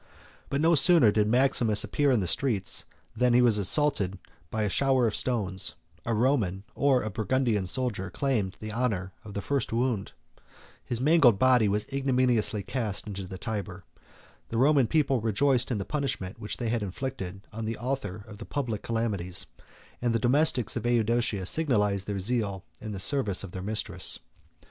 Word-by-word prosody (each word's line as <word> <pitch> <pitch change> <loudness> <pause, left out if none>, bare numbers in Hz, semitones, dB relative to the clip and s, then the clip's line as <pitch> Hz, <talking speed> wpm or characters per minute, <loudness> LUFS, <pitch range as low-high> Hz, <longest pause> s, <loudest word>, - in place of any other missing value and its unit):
But 140 - -1
no 165 +2 +4
sooner 165 - +7
did 105 0 +1
Maximus 115 -3 +2
appear 145 -1 0
in 125 -5 +3
the - - -1
streets, 100 0 +2 0.3
than 125 +1 +2
he 125 - +6
was 115 -4 +4
assaulted 100 - +2 0.3
by 110 -1 -2
a - - +1
shower 130 +4 +2
of 110 - 0
stones; 100 -7 0 0.3
a 115 - +1
Roman, 105 -6 +1
or 135 -3 +2
a 110 - -4
Burgundian 110 -1 0
soldier, 110 -5 -2
claimed 110 -9 -1
the 110 0 -6
honor 105 -6 -2
of 105 -2 -10
the 100 - -3
first 140 -3 -1
wound; 115 -3 -1 0.7
his 120 - -3
mangled 140 -6 +5
body 125 -1 +4
was 105 +1 0
ignominiously 125 -6 +1
cast 110 -5 -3
into 100 -3 -6
the 95 - -7
Tyber; 100 -2 -5 0.7
the 115 - -3
Roman 135 0 +4
people 135 -3 +1
rejoiced 125 +4 +2
in 120 - -1
the 100 - -4
punishment 135 -9 -3
which 105 -2 -4
they 120 - -2
had 115 0 -1
inflicted 95 -2 -5
on 110 +1 -5
the 115 +1 -3
author 110 -5 -4
of 105 -1 -11
the 115 - -7
public 120 -8 -3
calamities; 105 -6 -2 0.6
and 120 -1 0
the - - +4
domestics 125 0 +1
of - - -3
Eudoxia 115 -3 +1
signalized 105 - +1
their 100 -1 -2
zeal 100 -3 -2
in 110 - -7
the 100 - -5
service 105 -4 0
of 95 - -8
their 95 - -6
mistress. 105 +3 -1
115 Hz, 175 wpm, -27 LUFS, 100-130 Hz, 0.7 s, sooner